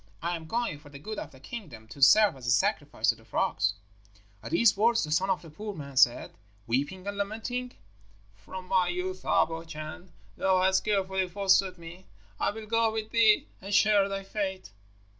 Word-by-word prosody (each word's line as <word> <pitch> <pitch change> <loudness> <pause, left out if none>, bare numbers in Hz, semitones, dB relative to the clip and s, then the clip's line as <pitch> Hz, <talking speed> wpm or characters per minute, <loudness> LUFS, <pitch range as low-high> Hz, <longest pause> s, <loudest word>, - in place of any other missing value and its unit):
I 175 +1 -2
am 160 -1 -8
going, 235 -7 -2
for 145 0 -15
the 140 - -11
good 215 +9 -6
of - - -7
the 130 - -17
kingdom, 135 - -9
to 140 - -11
serve 210 +6 +6
as 125 -2 -9
a - - +1
sacrifice 125 - +1
to - - +3
the - - -19
frogs.' 100 +1 0 0.7
At - - -7
these 210 +5 +4
words 230 +3 +3
the 155 - -4
son 185 +5 +1
of 185 -2 0
the 165 - -12
poor 205 +5 -7
man 140 -3 -9
said, 125 -2 +4 0.3
weeping 145 - -2
and 200 0 -4
lamenting, 225 +5 -3 0.6
'From 180 - -10
my 185 -1 +2
youth 185 +1 -3
up, 165 - +3
O 165 0 -5
Chan, 160 +2 -9 0.3
thou 185 -1 +2
hast 190 0 +2
carefully 190 -2 0
fostered 190 0 +2
me. 170 +2 -12 0.3
I - - +1
will 220 +1 -7
go 225 +1 +2
with 220 0 -4
thee, 225 -2 +4 0.2
and 195 +2 -7
share 205 -1 +4
thy 195 0 -4
fate.' 190 - -4
190 Hz, 195 wpm, -28 LUFS, 160-210 Hz, 0.7 s, serve